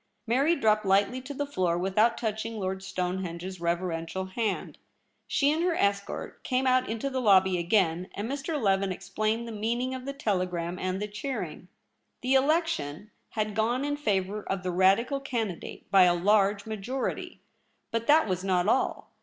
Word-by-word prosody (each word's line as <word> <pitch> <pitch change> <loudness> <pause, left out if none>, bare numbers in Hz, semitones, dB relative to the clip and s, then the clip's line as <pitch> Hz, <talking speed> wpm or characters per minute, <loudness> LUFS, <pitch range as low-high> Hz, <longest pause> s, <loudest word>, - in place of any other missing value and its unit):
Mary 275 +9 +3
dropped 215 -6 +2
lightly 200 +6 +2
to 260 +3 -8
the 285 +1 -2
floor 185 -11 0
without 195 +6 +2
touching 220 0 -3
Lord 190 -1 -3
Stonehenge's 180 -1 -4
reverential 170 +1 -2
hand. 205 +1 -3 0.5
She 280 +1 +2
and 315 +2 0
her 350 -1 +1
escort 200 -4 -2
came 255 0 0
out 255 0 +3
into 225 +4 -2
the 260 -1 -1
lobby 190 -4 +5
again, 175 -1 +1
and 205 +2 -3
]\Ir. 290 +3 -3
Leven 195 -5 +1
explained 215 +5 -2
the - - -6
mean 225 +2 -1
ing 255 +1 -2
of 255 -1 -6
the 275 - -3
telegram 180 -7 -2
and 185 0 -2
the 210 - -2
cheering. 210 - -5 0.5
The 255 +1 +1
election 265 - +1 0.2
had 215 -1 -1
gone 235 +6 +1
in 290 0 0
favour 205 -6 -1
of 195 -2 -3
the 185 - -1
Radical 195 +10 +3
candidate 230 -9 -4
by 190 -2 +7
a 175 -1 +4
large 200 +2 +3
majority. 220 +5 -4 0.5
But 230 0 -2
that 310 -1 +5
was 185 -1 -2
not 185 -1 +1
all. 260 - 0
210 Hz, 170 wpm, -28 LUFS, 185-250 Hz, 0.5 s, by